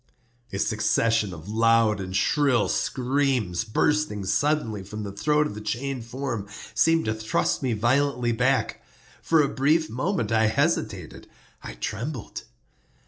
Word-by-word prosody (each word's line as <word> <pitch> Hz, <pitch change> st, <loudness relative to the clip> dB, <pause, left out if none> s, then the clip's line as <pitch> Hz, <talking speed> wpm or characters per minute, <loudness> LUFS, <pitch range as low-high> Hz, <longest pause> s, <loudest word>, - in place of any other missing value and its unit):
A 95 Hz, -, -4 dB
succession 110 Hz, 0 st, +1 dB
of 85 Hz, 0 st, -10 dB
loud 115 Hz, -1 st, +3 dB
and 95 Hz, 0 st, -5 dB
shrill 140 Hz, -6 st, +2 dB
screams, 125 Hz, -8 st, 0 dB
bursting 110 Hz, -1 st, 0 dB
suddenly 115 Hz, -1 st, 0 dB
from 105 Hz, +3 st, -7 dB
the 100 Hz, -, -5 dB
throat 150 Hz, +9 st, +1 dB
of 150 Hz, -, -4 dB
the 105 Hz, -, -8 dB
chained 125 Hz, +3 st, -3 dB
form, 120 Hz, -4 st, -4 dB, 0.3 s
seemed 165 Hz, 0 st, +3 dB
to 110 Hz, -, 0 dB
thrust 110 Hz, +1 st, -1 dB
me 130 Hz, -4 st, 0 dB
violently 125 Hz, +2 st, +1 dB
back. 125 Hz, +3 st, 0 dB, 0.4 s
For 160 Hz, -2 st, +3 dB
a -, -, +1 dB
brief 155 Hz, +5 st, +1 dB
moment 170 Hz, -, -1 dB
I 110 Hz, -1 st, +3 dB
hesitated—I 110 Hz, -, -3 dB
trembled. 115 Hz, -, -5 dB
115 Hz, 135 wpm, -25 LUFS, 105-140 Hz, 0.4 s, loud